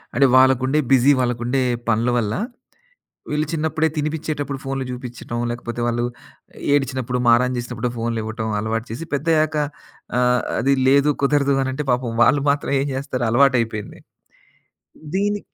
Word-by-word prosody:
అంటే 140 - +5
వాళ్ళకుండే 130 +2 +4
బిజీ 135 +2 +6
వాళ్ళకుండే 125 +2 0 0.3
పనుల 115 +2 +2
వల్ల. 105 -3 0 1.0
వీళ్ళు 150 +1 0
చిన్నప్పుడే 160 0 0
తినిపిచ్చేటప్పుడు 150 -2 -3
ఫోన్లు 135 0 -3
చూపిచ్చటం 125 -1 -6
లేకపోతే 120 0 -6
వాళ్ళు 120 0 0 0.7
ఏడ్చినప్పుడు 130 -3 0
మారాం 120 +2 +4
చేసినప్పుడు 120 0 -3
ఫోన్లు 115 0 -2
ఇవ్వటం 110 0 -4
అలవాటు 110 +2 -2
చేసి 120 +9 -5
పెద్దయ్యాక 155 +1 +1 0.6
ఆహ్, 125 0 +3 0.2
అది 140 +2 +2
లేదు 140 +2 +4
కుదరదు 140 0 +3
అనంటే 135 +3 -3
పాపం 125 -2 -1
వాళ్ళు 140 +2 +3
మాత్రం 140 0 -2
ఏం 140 - -1
చేస్తారు 130 -2 -2
అలవాటైపోయింది. 120 -4 +1 1.2
దీని 205 +1 0
130 Hz, 125 wpm, -21 LUFS, 120-145 Hz, 1.2 s, బిజీ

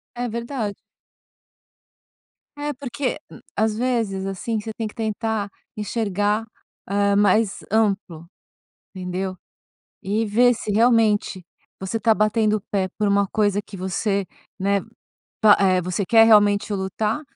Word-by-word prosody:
É 245 0 -2
verdade. 235 -2 -3 1.8
É 290 0 -3
porque, 255 -1 -3
hum, - - -12 0.2
às 220 0 +1
vezes, 225 -6 -1
assim, 205 +4 -3
você 220 +1 -6
tem 225 - -3
que 210 - -8
tentar 220 -2 -2 0.3
enxergar, 210 0 -1 0.4
ah, 200 0 +1
mais 205 0 +3
amplo, 200 -6 0 0.7
entendeu? 185 +1 -4 0.7
E 210 +4 0
ver 245 +4 +4
se 215 -2 -4
realmente 215 -5 +2 0.3
você 190 +4 -3
está 225 0 +3
batendo 215 0 +2
o - - -9
pé 190 -2 0
por 210 - +1
uma 200 0 +3
coisa 205 -1 +1
que 200 - -10
você, 195 +2 -1 0.3
né? 200 +1 +1 0.6
Pa 215 -2 +7
eh, 185 -2 +3
você 180 +3 -2
quer 225 +3 +6
realmente 205 -1 +4
lutar, 205 +6 -2
210 Hz, 130 wpm, -22 LUFS, 195-225 Hz, 1.8 s, Pa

